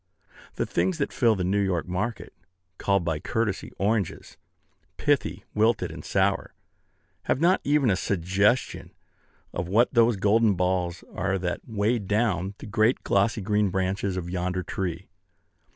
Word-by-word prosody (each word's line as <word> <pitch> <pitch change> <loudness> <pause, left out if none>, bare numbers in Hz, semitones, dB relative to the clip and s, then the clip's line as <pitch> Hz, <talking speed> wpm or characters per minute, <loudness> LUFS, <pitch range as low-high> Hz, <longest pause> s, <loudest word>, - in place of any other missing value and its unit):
The - - -1
things 185 -3 0
that 140 - -2
fill 115 -4 +3
the 95 - -2
New 95 +3 +1
York 90 -4 -1
market, 105 +6 -3 0.5
called 100 -3 +1
by 80 -3 -1
courtesy 110 -1 -2
"oranges," 105 -2 -1 0.6
pithy, - - 0
wilted, 105 -5 +2
and 80 - -9
sour, 95 0 0 0.7
have - - +1
not 175 +4 +3
even 145 -5 +3
a - - +3
suggestion 100 +6 0 0.6
of 85 - -3
what 115 +9 +3
those 115 -1 +4
golden 105 +1 +3
balls 90 -1 -1
are 95 -1 -1
that 90 -1 -3
weigh 110 +1 0
down 100 -2 0
the - - -10
great 110 +4 +1
glossy 105 +2 +1
green 105 +1 +1
branches 95 +1 -1
of 90 -2 -4
yonder 90 +1 -2
tree. 90 -1 -4
100 Hz, 145 wpm, -26 LUFS, 90-110 Hz, 0.7 s, those